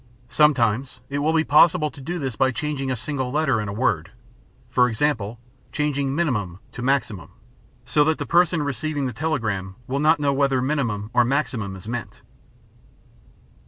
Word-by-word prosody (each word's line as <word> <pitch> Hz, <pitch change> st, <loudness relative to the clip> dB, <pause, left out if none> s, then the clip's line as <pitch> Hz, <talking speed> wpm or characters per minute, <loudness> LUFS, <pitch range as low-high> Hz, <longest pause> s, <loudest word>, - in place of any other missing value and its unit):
Sometimes 125 Hz, -4 st, +2 dB
it 140 Hz, -, -1 dB
will 150 Hz, +2 st, +1 dB
be 160 Hz, -1 st, +3 dB
possible 155 Hz, +1 st, +4 dB
to 140 Hz, -, -13 dB
do 175 Hz, +6 st, -4 dB
this 135 Hz, -7 st, -3 dB
by 130 Hz, -, +3 dB
changing 135 Hz, +1 st, -3 dB
a 130 Hz, -, 0 dB
single 130 Hz, 0 st, -3 dB
letter 140 Hz, -6 st, +1 dB
in 105 Hz, -, -4 dB
a -, -, -3 dB
word—for 120 Hz, +4 st, -2 dB
example, 115 Hz, -3 st, -1 dB, 0.3 s
changing 140 Hz, -2 st, -1 dB
"minimum" 105 Hz, -, -1 dB
to -, -, -8 dB
"maximum," 125 Hz, -8 st, -1 dB, 0.6 s
so 145 Hz, +4 st, +3 dB
that 160 Hz, 0 st, +2 dB
the -, -, -4 dB
person 170 Hz, -2 st, +3 dB
receiving 145 Hz, +1 st, -2 dB
the 125 Hz, -, -3 dB
telegram 110 Hz, -10 st, -2 dB
will 135 Hz, +3 st, -2 dB
not 155 Hz, +1 st, +4 dB
know 140 Hz, -1 st, +1 dB
whether 135 Hz, -1 st, +2 dB
"minimum" 120 Hz, -6 st, -1 dB
or 125 Hz, -, +5 dB
"maximum" 120 Hz, -6 st, -1 dB
is 95 Hz, +2 st, -11 dB
meant. 120 Hz, 0 st, -5 dB
135 Hz, 160 wpm, -23 LUFS, 115-150 Hz, 0.6 s, or